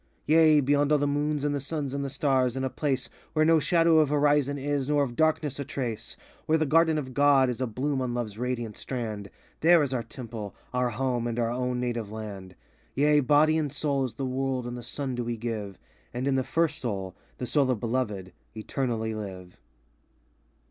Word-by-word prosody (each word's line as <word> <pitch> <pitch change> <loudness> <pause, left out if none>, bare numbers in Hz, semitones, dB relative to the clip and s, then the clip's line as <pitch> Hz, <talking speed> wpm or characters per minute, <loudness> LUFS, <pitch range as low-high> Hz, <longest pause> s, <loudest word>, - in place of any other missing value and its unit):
84 155 - +4
Yea, 155 -2 +6
beyond 145 +2 +2
all 150 - +5
the 145 - 0
moons 145 0 0
and 145 0 +1
the 145 - -1
suns 140 -1 -4
^ud 140 - -2
the 140 - -3
stars, 130 -3 +1
in 130 - -2
a 130 - -1
place 140 -4 -1 0.3
Where 155 0 +3
no 165 0 +5
shadow 165 +1 +4
of 155 -3 +3
horizon 145 -1 +2
is, 140 0 -1
nor 145 -1 +3
of 120 -3 -4
darKness 155 -2 +1
a - - -1
trace, 125 -6 -4 0.3
Where 160 - +4
the 155 - +1
Garden 160 +2 +4
of 130 -4 -4
God 140 -2 +4
is 125 - -6
a 130 - 0
bloom 130 +4 -2
on 125 -2 -2
Love's 115 -4 -3
radiant 120 -2 -3
strand, 110 -6 -5 0.3
There 170 -1 +6
is 135 -2 -2
our 125 - 0
temple, 115 -3 -8 0.2
our 125 0 +1
home, 120 0 -1
and 115 -1 -3
our 115 -1 0
own 125 0 -1
native 120 -4 -3
land. 100 -4 -7 0.4
Yea, 150 +2 +4
body 150 +3 +4
and 150 -3 -2
soul 140 -2 0
to - - -20
the 135 - -2
world 130 -1 -1
and 120 0 -5
the 120 - -6
sun 130 +2 -4
do 120 0 -2
we 120 0 -3
give, 110 -4 -4 0.4
And 125 +2 -2
in 140 - +2
the 130 0 +1
First 160 +1 0
Soul—the 100 - -5
Soul 135 +2 +2
of 125 -4 +1
Beloved—eternally 110 +1 -3
live. 95 -4 -7
130 Hz, 205 wpm, -27 LUFS, 120-145 Hz, 0.4 s, Yea